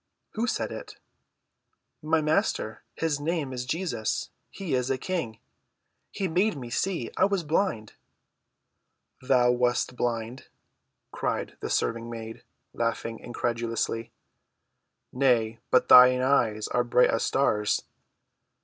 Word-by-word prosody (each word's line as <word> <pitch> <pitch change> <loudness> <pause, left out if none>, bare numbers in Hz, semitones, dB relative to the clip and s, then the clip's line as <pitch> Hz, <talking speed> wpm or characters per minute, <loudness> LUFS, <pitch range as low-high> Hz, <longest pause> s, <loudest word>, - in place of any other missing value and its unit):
"Who 225 +2 -2
said - - -2
it?" - - -8 1.1
"My 160 +1 +1
Master. 155 - 0
His 160 -3 -1
Name 150 -3 -2
is 125 0 -5
Jesus. 155 -8 -2 0.2
He 185 -7 -5
is 125 0 0
a 135 - +1
King. 130 -8 -3 0.7
He 195 - -3
made 185 +2 +1
me 120 -3 -8
see. 170 -4 -1
I 190 - +5
was 200 -3 0
blind." 155 - -1 1.3
"Thou 125 -2 +3
wast 125 0 0
blind?" 120 +1 -3 0.6
cried - - -3
the - - -4
serving‐maid, 115 -1 -3 0.3
laughing 115 -1 -2
incredulously. 115 -1 -2 1.0
"Nay, 120 -4 +2
but 125 - +3
thine 125 0 +8
eyes 115 -5 +2
are 120 - +1
bright 125 +1 +4
as 115 - 0
stars." 105 -6 +1
125 Hz, 115 wpm, -27 LUFS, 115-155 Hz, 1.3 s, thine